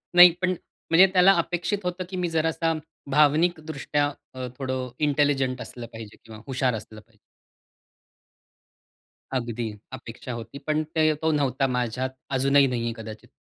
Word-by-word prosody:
नाही 175 0 +11
पण 185 0 +2 0.4
म्हणजे 180 +4 +7
त्याला 185 +1 +7
अपेक्षित 175 +4 -1
होतं 180 +1 -3
की 190 - -6
मी 175 -1 -1
जरासा, 165 0 0 0.4
भावनिकदृष्ट्या 150 0 +2 0.3
अ, 130 -1 -5
थोडं 130 -2 -3 0.2
इंटेलिजंट 135 -3 +1
असलं 120 -1 -7
पाहिजे 110 -2 -10
किंवा 110 -1 -11
हुशार 130 -2 0
असलं 110 0 -9
पाहिजे. 110 -1 -31 2.2
अगदी 120 -2 -4 0.2
अपेक्षा 115 +2 -8
होती. 115 +3 -7
पण 150 +2 -1
ते 155 -1 +4
तो 160 0 +2
नव्हता 135 -1 +1
माझ्यात 125 +2 -1 0.3
अजूनही 140 +1 +5
नाहीये 115 -2 -2
कदाचित. 110 -1 -9
135 Hz, 135 wpm, -25 LUFS, 120-160 Hz, 2.2 s, नाही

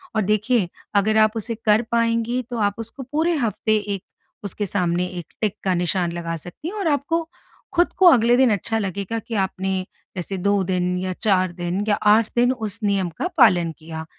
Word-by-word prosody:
और 220 - +2
देखिए 215 -1 +1 0.3
अगर 215 +2 +3
आप 215 0 +4
उसे 225 +1 -2
कर 215 +1 +5
पाएँगी 230 +1 +1
तो 245 - -4
आप 205 -1 +1
उसको 230 +4 -7
पूरे 310 +7 0
हफ्ते 220 -3 0
एक 205 -2 -4 0.4
उसके 205 +1 -3
सामने 180 -2 0
एक 170 - -11
टिक 215 -3 0
का 190 - +1
निशान 175 0 0
लगा 170 -1 -4
सकती 175 - -9
हैं 385 - -5
और 390 - -1
आपको 300 +3 +1 0.5
ख़ुद 350 0 +3
को 380 - +4
अगले 240 -2 +4
दिन 260 -2 +4
अच्छा 215 +2 0
लगेगा 200 +2 -3
कि 225 +1 -7
आपने 190 -1 -1 0.3
जैसे 185 +2 -4
2 200 +1 +1
दिन 180 -1 0
या 185 0 -2
4 185 -4 +2
दिन 175 +3 -2
या 205 - +3 0.2
8 220 +1 +4
दिन 245 +1 +4
उस 220 -4 -3
नियम 200 -3 +1
का - - 0
पालन 175 -6 +5
किया। 160 0 -7
205 Hz, 195 wpm, -22 LUFS, 185-230 Hz, 0.5 s, कर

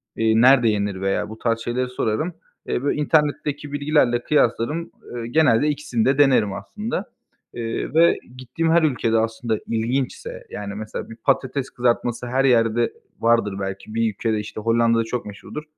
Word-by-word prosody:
Eee, 110 0 +3
nerede 125 -2 +6
yenir?" 100 -2 -1
veya 95 +2 -1
bu 110 - -9
tarz 115 -1 0
şeyleri 125 +2 -2
sorarım. 125 +7 -1 0.3
Eee, 125 - -1
bö 145 - +2
internetteki 150 -1 0
bilgilerle 145 -4 +2
kıyaslarım, 150 +3 +1
ııı, 120 -1 -6
genelde 135 0 +3
ikisini 145 -6 -1
de 135 +1 +3
denerim 130 -8 +4
aslında. 210 - -4 0.5
Iıı, 115 +3 -3
ve 170 +1 +5 0.2
gittiğim 145 +6 -1
her 170 -1 +4
ülkede 115 -6 +1
aslında 110 0 -1
ilginçse, 120 +4 -2
yani, 100 -1 -6
mesela 110 +2 -6
bir 115 - -9
patates 130 +3 0
kızartması 120 0 -1
her 130 +2 +1
yerde 115 -2 +3 0.3
vardır 115 -4 +2
belki. 95 +2 -5
Bir 115 -1 +2
ülkede, 110 +1 -1
işte, 105 +1 -6
Hollanda'da 115 0 +3
çok 120 +2 -4
meşhurdur. 105 +9 -8
120 Hz, 155 wpm, -22 LUFS, 110-140 Hz, 0.5 s, nerede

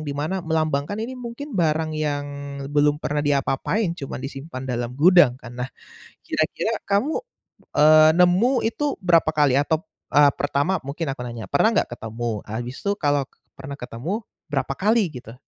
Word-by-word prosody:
dimana 150 +7 -2
melambangkan 155 0 -1
ini 225 +4 -4
mungkin 250 +3 -7
barang 155 0 +1
yang 150 -2 -1 0.5
belum 145 0 +3
pernah 150 -1 -2
di 145 -1 +2
apa-apain, 170 +8 0
cuman 135 - -5
disimpan 135 -1 -7
dalam 125 -1 -3
gudang 165 -5 +6
kan. 120 -2 -11
Nah 125 - -2 0.6
kira-kira 190 +8 -1
kamu 240 - +1 0.6
eee, 155 +1 +7
nemu 190 +9 +4
itu 280 +6 -1
berapa 170 -3 +4
kali 145 -3 +3
atau 160 +2 +1 0.3
eee, 145 -1 +5
pertama 145 +6 +1
mungkin 140 +1 -4
aku 135 - -9
nanya, 120 -2 -6
pernah 140 +10 +4
enggak - - +1
ketemu, 115 -1 -4
habis 120 +4 -5
tuh 200 0 -1
kalo 145 -5 0 0.2
pernah 140 +1 -8
ketemu 150 - -5 0.2
berapa 135 -2 -1
kali 205 +1 +1
gitu? 115 +1 -12
150 Hz, 155 wpm, -23 LUFS, 135-180 Hz, 0.6 s, eee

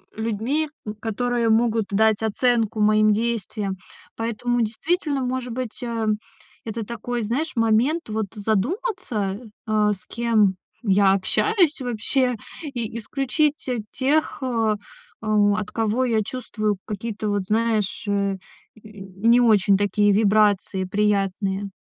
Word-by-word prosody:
людьми, 230 +8 -1 0.2
м, 210 - -4
которые 230 +2 -1
могут 225 -1 +2
дать 220 +1 +3
оценку 225 0 +1
моим 215 0 +4
действиям. 215 -3 -2 0.4
Поэтому, 235 +2 -1
действительно, 285 - -1
может 250 -1 -3
быть, 250 -1 -5
эм, 225 -3 0 0.5
это 225 0 -4
такой, 235 +2 -4
знаешь, 250 +9 -1
момент 230 +8 +2
вот 215 0 -1
задуматься, 220 - -1 0.3
а, 210 -1 +2
с 190 - -11
кем 220 -4 +2 0.3
я 200 -2 +4
общаюсь 340 - +2
вообще, 250 +2 0 0.3
и 240 -7 -4
исключить, 275 +6 -1
э, 245 -2 -1
тех, 290 +4 0
э, 230 -4 +1 0.5
о 210 -2 +3
от 215 -1 -3
кого 225 +3 0
я 225 -3 +2
чувствую 215 -4 -2
какие-то, 215 0 -4
вот 205 -2 0
знаешь, 220 -2 0
э, 200 -1 0 0.4
y 210 -3 -12 0.2
не 240 +1 +6
очень 210 -4 +4
такие 205 +1 +2
вибрации 205 -2 +2
приятные. 200 0 0
220 Hz, 125 wpm, -23 LUFS, 210-245 Hz, 0.5 s, не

